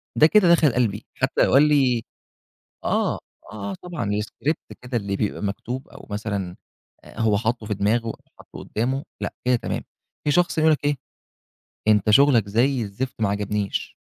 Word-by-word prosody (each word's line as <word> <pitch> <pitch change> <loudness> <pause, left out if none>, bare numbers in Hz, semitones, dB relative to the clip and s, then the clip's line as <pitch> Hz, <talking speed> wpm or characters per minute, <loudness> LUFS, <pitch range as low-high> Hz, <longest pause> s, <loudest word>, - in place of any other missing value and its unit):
ده 155 - +7
كده 185 -1 +5
دخل 160 -6 +5
قلبي، 110 -5 0
حتّى - - 0
لو - - +2
قال 135 - +7
لي 130 -6 +3 0.8
آه، - - +1
آه، - - -6 0.3
آه 100 -2 -5
طبعًا، 175 - -5
الscript 110 +8 -3
كده 125 0 -4
اللي 100 -3 -1
بيبقى 105 0 -2
مكتوب، 120 +6 -4
أو - - -13
مثلًا 100 -4 -3 0.5
آآ - - -10
هو 110 -2 +3
حاطه 115 0 -1
في 105 - -1
دماغه 110 +4 +1
أو 115 - -4 0.2
حاطه - - -13
قدّامه، 130 +6 -2 0.2
لأ - - -3
كده 125 0 +3
تمام. - - -4 0.4
في 150 - +2
شخص 175 +2 +2
ييجي 155 - +4
يقول - - +6
لك 145 - -1
إيه، 145 0 +2 0.9
أنت 105 -1 +4
شُغلك 120 -3 +5
زي 120 +5 +2
الزفت، 115 +5 -5
ما 105 - +2
عجبنيش. 100 0 -2
115 Hz, 180 wpm, -23 LUFS, 105-135 Hz, 0.9 s, ده